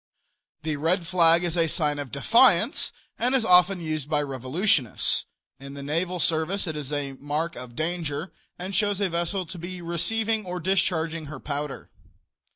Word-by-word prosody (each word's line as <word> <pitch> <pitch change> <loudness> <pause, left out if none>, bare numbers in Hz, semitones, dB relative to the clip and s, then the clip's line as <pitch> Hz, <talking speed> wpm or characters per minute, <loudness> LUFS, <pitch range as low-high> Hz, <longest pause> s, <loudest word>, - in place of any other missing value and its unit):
The 155 -1 -1
red 170 +4 +1
flag 170 -1 +4
is 175 -1 -1
a 165 -1 +3
sign 150 -3 0
of 140 -4 -6
defiance, 145 +12 +4 0.3
and 250 +3 +1
is 250 -4 +2
often 180 0 +5
used 155 -3 -3
by 150 -1 +1
revolutionists. 135 - 0 0.3
In 140 +1 -9
the 140 - -7
naval 170 +5 -1
service 165 +5 0
it 160 -3 -4
is 150 -2 -4
a 145 -2 -2
mark 150 +4 -2
of 125 -2 -9
danger, 160 0 -3 0.2
and 185 +2 -6
shows 205 0 +1
a 200 -2 +1
vessel 175 +3 -2
to 175 +1 -9
be 180 +2 -6
receiving 220 +6 +1
or 180 -1 -5
discharging 165 -4 0
her 145 -2 -8
powder. 145 0 -5
165 Hz, 165 wpm, -26 LUFS, 150-185 Hz, 0.3 s, often